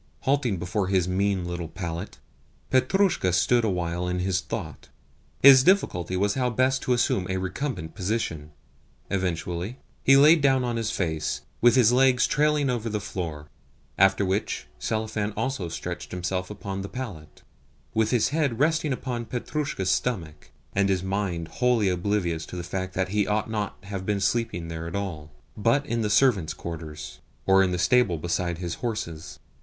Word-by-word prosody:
Halting 130 -7 +1
before 90 +3 -2
his 95 -2 +2
mean 95 0 0
little 85 -1 -4
pallet, 85 +2 -6 0.5
Petrushka 130 - +2
stood 120 +7 +3
awhile 90 -3 -1
in 90 0 -1
thought. 90 -3 -4 0.5
His 135 -1 +9
difficulty 95 - +2
was 100 +2 +1
how 125 -2 0
best 130 +3 +1
to 125 - +1
assume 100 -6 +1
a 95 - 0
recumbent 95 - -4
position. 90 -7 -2 0.6
Eventually 90 +3 -2 0.3
he 135 0 +7
lay 150 +4 +8
down 135 -3 +3
on 120 -1 -1
his 115 -1 -1
face, 80 -7 -2 0.2
with 120 +1 +6
his 120 -3 +5
legs 130 0 +4
trailing 150 -1 +2
over 120 -3 -1
the 105 -1 -2
floor; 80 -6 -5 0.5
after 95 +1 +4
which 95 - -1
Selifan 110 - -2
also 130 -10 -2
stretched 80 - -5
himself 90 +1 -3
upon 100 -2 -5
the 100 - -6
pallet, 100 - -8 0.5
with 110 0 +2
his 115 -2 +2
head 145 -5 0
resting 155 0 +2
upon 125 -2 -3
Petrushka's 125 -6 -2
stomach, 90 -9 -2 0.2
and 100 0 +2
his 95 -2 +1
mind 95 -4 -2
wholly 120 0 +2
oblivious 90 -3 -1
of 90 - -6
the 90 - -4
fact 95 +1 -4
that 95 0 0
he 105 0 +1
ought 105 +1 -1
not 105 -4 -3
to 100 - -13
have 95 -2 -4
been 105 -1 +1
sleeping 95 -4 -1
there 80 0 -5
at 85 - -6
all, 85 -7 -4 0.3
but 115 +7 +2
in 120 -4 -1
the 105 - 0
servant's 105 - +3
quarters, 75 -7 -7 0.3
or 95 0 +5
in 95 - +3
the 90 - -1
stable 120 -2 +3
beside 85 +1 -2
his 85 -1 -4
horses. 105 -9 -4
100 Hz, 165 wpm, -26 LUFS, 90-120 Hz, 0.6 s, His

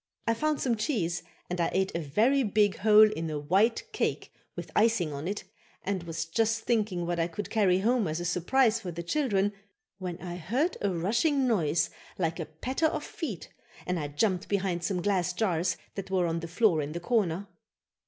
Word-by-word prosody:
I 230 - +3
found 305 +5 0
some 240 -4 +1
cheese 205 - -1 0.3
and 180 0 -2
I 170 - +2
ate 190 0 +1
a - - 0
very 220 - +2
big 210 -3 +2
hole 215 +1 +7
in 165 -5 -3
a 155 - -2
white 195 - +2
cake - - -2 0.2
with - - -7
icing 210 -8 +3
on 140 +4 -5
it 205 +2 -3 0.4
and 195 -2 -1
was 165 -1 -4
just 225 +6 +1
thinking 210 -8 0
what 170 0 -1
I 165 - +2
could 185 +4 -6
carry 190 -4 +3
home 235 0 +2
as 155 +2 -2
a 175 - -4
surprise 220 +7 +2
for 195 -5 -6
the 170 +1 -5
children 205 - +1 0.5
when 180 -2 -4
I 175 -1 -6
heard 245 - 0
a 200 - +1
rushing 240 - +1
noise 170 -9 +1 0.3
like 165 -3 -1
the 165 - -4
patter 260 - -1
of 315 - -3
feet 225 - -6 0.4
and 180 -1 -1
I 150 - -2
jumped 180 +6 0
behind 185 -4 0
some 180 0 -1
glass 180 -3 +1
jars 180 -4 0 0.2
that 195 -1 -6
were 185 -2 +2
on 165 0 -1
the 165 - -6
floor 170 -2 +3
in 145 +1 -4
the 170 - -3
corner. 195 -2 0
190 Hz, 200 wpm, -29 LUFS, 170-225 Hz, 0.5 s, hole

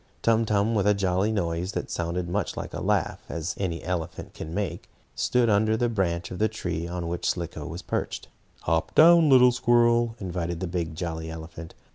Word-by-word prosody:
Tum 115 0 +3
Tum, 105 +1 +1
with 100 -2 +1
a 105 - +4
jolly 95 +2 +1
noise 90 -2 -2
that - - -4
sounded 85 +1 -2
as 85 - -7
much 100 -1 -2
like - - -5
a - - -4
laugh - - 0
as 85 +1 -3
any 85 -4 -2
elephant 85 -2 -4
can 80 - -7
make, 100 +2 -4 0.2
stood 125 -1 +1
under 110 +1 +3
the 120 +1 +1
branch 85 -6 -1
of 90 - -6
the 110 +1 +2
tree 85 -6 -4
on 85 -1 -4
which 85 +1 -1
Slicko 85 -3 -4
was 85 +2 -7
perched. - - -3 0.3
"Hop 80 0 -1
down, 165 -1 +7
little 125 -2 +7
squirrel," 120 -1 +3
invited 85 -3 -3
the 95 - -2
big, 85 -2 -3
jolly 80 -1 -4
elephant. 80 0 -9
90 Hz, 195 wpm, -26 LUFS, 85-110 Hz, 0.3 s, down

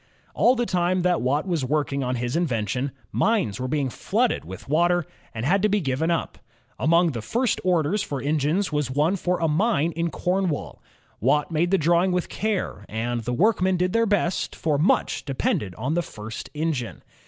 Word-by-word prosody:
All 250 - +4
the 240 -1 0
time 180 -2 +1
that 180 -1 +2
Watt 140 +7 0
was 170 -6 0
working 140 0 0
on 125 0 -1
his 120 +2 -2
invention, 125 - -1 0.2
mines 200 - +1
were 130 - -2
being 135 -1 -1
flooded - - 0
with 95 +3 -10
water 175 +3 +2 0.3
and 110 +1 -4
had 195 +6 +3
to 210 - +3
be 210 +1 +2
given 145 0 -1
up. 170 -1 -2 0.4
Among 170 +1 +3
the 115 -5 -4
first 235 - 0
orders 180 +2 +1
for 140 -8 -3
engines 155 +6 0
was 150 -3 0
one 150 +8 +1
for 180 -1 -1
a 165 - +1
mine 170 0 +2
in 170 +1 -1
Cornwall. 180 -2 -2 0.4
Watt 150 - +2
made 165 +2 +1
the 195 - +3
drawing 175 +3 +3
with 180 -1 -1
care, 210 - -2
and 120 +2 -2
the 120 +2 -3
workmen 185 - +2
did 180 +1 0
their 230 0 +3
best, 190 -3 0
for 150 -3 0
much 165 - +1
depended 105 -8 -1
on 130 +7 -2
the 175 - +1
first 110 -8 -8
engine. 150 -6 -2
160 Hz, 190 wpm, -24 LUFS, 130-180 Hz, 0.4 s, All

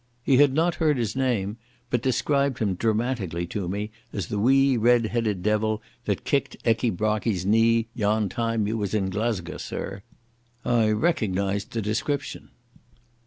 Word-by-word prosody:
He 135 0 +4
had 145 0 +6
not 165 +2 +2
heard 150 -3 +3
his 115 -2 -2
name, 115 -6 0 0.3
but 120 - +1
described 140 +1 +1
him 105 -4 0
dramatically 110 -4 -1
to 90 +1 -4
me 105 +3 -3 0.2
as 100 -6 -4
"the 105 - -2
wee 135 +4 +4
red 120 0 +4
headed 110 -5 -1
devil 110 0 +1 0.3
that - - -1
kicked - - -1
Ecky 115 +1 +2
Brockie's 105 -1 -1
knee 115 +2 +3
yon 105 -2 +1
time 115 0 -1
in 110 +1 -1 0.3
Glesca, 100 -4 -2
sirr," 95 0 -5 0.6
I 115 -3 +3
recognised 100 - 0
the 115 -2 -2
description. 135 +6 -3
110 Hz, 145 wpm, -25 LUFS, 105-120 Hz, 0.6 s, had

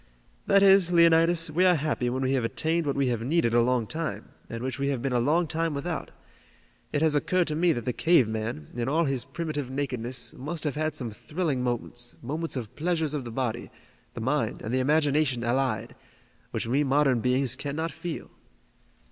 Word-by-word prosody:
"That 200 0 +5
is, 195 -2 +6
Leonidas, 165 -1 +4
we 175 +4 +2
are 180 -1 +5
happy 145 -5 -1
when 130 +2 -2
we 130 - +1
have 130 -3 +1
attained 160 +7 0
what 140 - 0
we 140 -2 +1
have 120 -2 -1
needed 125 -2 +1
a 120 - +5
long 125 -1 +1
time, 160 +7 -4 0.2
and 115 +1 -5
which 130 +1 -4
we 140 - 0
have 140 -3 0
been 135 +1 -2
a 120 - +3
long 155 +8 +2
time 165 0 -1
without. 165 +4 -4 0.8
It 145 - 0
has 160 -2 +3
occurred 165 +5 +1
to 150 - -1
me 170 +2 +3
that 120 -5 -5
the 125 - -1
cave 160 -6 +4
man, 110 -9 -4
in 120 +1 -2
all 165 +3 +2
his 135 -3 -1
primitive 155 -5 -4
nakedness, 125 -3 -2
must 155 +5 -5
have 150 -3 0
had 155 +1 -2
some 120 -4 -3
thrilling 150 - -2
moments, 120 0 -2
moments 155 +6 -3
of 115 -5 -6
pleasures 160 -2 -1
of 140 -4 -3
the 120 - -6
body, 120 -1 -3 0.5
the 115 - -5
mind 130 -1 -1
and 110 - -4
the 130 - +2
imagination 145 -2 +2
allied, 130 +3 -1 0.6
which - - -3
we 135 +6 +1
modern 135 -2 +3
beings 125 +1 +1
cannot 150 +5 -3
feel." 175 -3 -6
140 Hz, 200 wpm, -27 LUFS, 125-160 Hz, 0.8 s, is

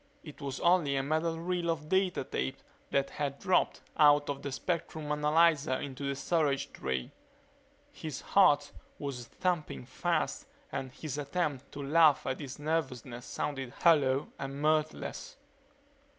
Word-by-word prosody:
It 150 -2 -11
was 140 -2 -4
only 170 -5 +4
a 135 - +1
metal 160 +3 0
reel 175 0 -1
of 160 -2 -2
data 190 -3 +1
tape 65 - -3 0.3
that 140 0 +1
had 140 -1 -3
dropped 185 - +1 0.2
out 145 -1 +5
of 140 -1 -6
the 140 - -4
spectrum 160 0 -3
analyzer 150 -1 +3
into 140 0 -5
the 140 - -1
storage 145 -2 0
tray. 65 -1 -3 0.8
His 155 -4 -6
heart 145 -7 +4 0.3
was 130 -5 -5
thumping 160 - -2
fast - - -1 0.2
and 130 -1 -4
his 145 +2 -5
attempt 145 -2 -2
to 145 - -5
laugh 155 +1 +5
at 130 - -2
his 140 -3 -7
nervousness 135 -6 -3
sounded 135 -3 -3
hollow 140 -5 +4
and 135 0 -5
mirthless. 155 +1 -1
145 Hz, 140 wpm, -31 LUFS, 135-160 Hz, 0.8 s, out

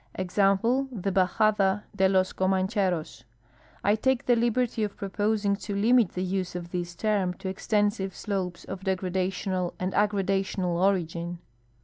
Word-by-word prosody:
Example, 195 +7 +2
the 200 -4 -2
Bajada 195 +1 +2
de 190 -1 +3
los 185 -1 +2
Comancheros. 185 - 0 0.6
I 205 - +4
take 255 +4 +1
the 245 - +4
liberty 235 -1 +1
of 205 -1 -3
proposing 205 +1 0
to 200 0 -5
limit 225 0 +3
the 180 - -2
use 185 -1 -2
of 175 -1 -6
this 175 -1 -4
term 195 -2 0
to 190 0 -5
extensive 205 0 0
slopes 190 -4 -3
of 190 - -6
degradational 185 -1 -2
and 185 +1 -2
aggradational 195 -3 0
origin. 175 -2 0
195 Hz, 135 wpm, -27 LUFS, 185-210 Hz, 0.6 s, I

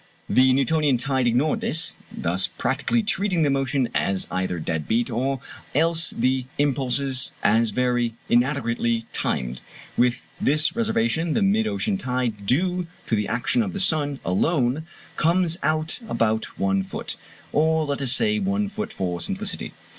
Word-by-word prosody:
The 130 0 +4
Newtonian 140 0 +2
tide 130 0 0
ignored 125 +6 +1
this, 160 +2 0 0.2
thus 90 +3 -1
practically 140 - -1
treating 200 -5 +1
the 145 - +2
motion 135 -1 0
as 95 -1 0
either 95 -1 -1
dead 80 -1 -3
beat, 120 +3 +1
or 130 +3 -1 0.3
else 165 +2 +3
the 130 +1 +1
impulses 135 -1 +1
as 115 +2 +3
very 120 0 0
inadequately 120 -2 +1
timed. 65 0 -2 0.3
With 120 0 +1
this 155 +3 +3
reservation 225 -8 0
the 220 - +2
mid 215 +3 +2
ocean 200 -1 -1
tide 125 - -2
due 180 - +1 0.2
to 115 - 0
the 105 -1 -1
action 180 - +1
of 195 -4 -2
the 200 - -3
sun 145 -6 +2
alone 135 - +1 0.3
comes 170 +1 +2
out 155 +2 0
about 110 -1 0
one 95 0 +1
foot, 95 - -4 0.4
or 160 +1 +2
let 140 -1 -2
us 130 -3 +3
say 215 - +3
one 200 +1 0
foot 215 +2 -5
for 90 -2 -3
simplicity. - - -2
135 Hz, 150 wpm, -24 LUFS, 120-165 Hz, 0.4 s, The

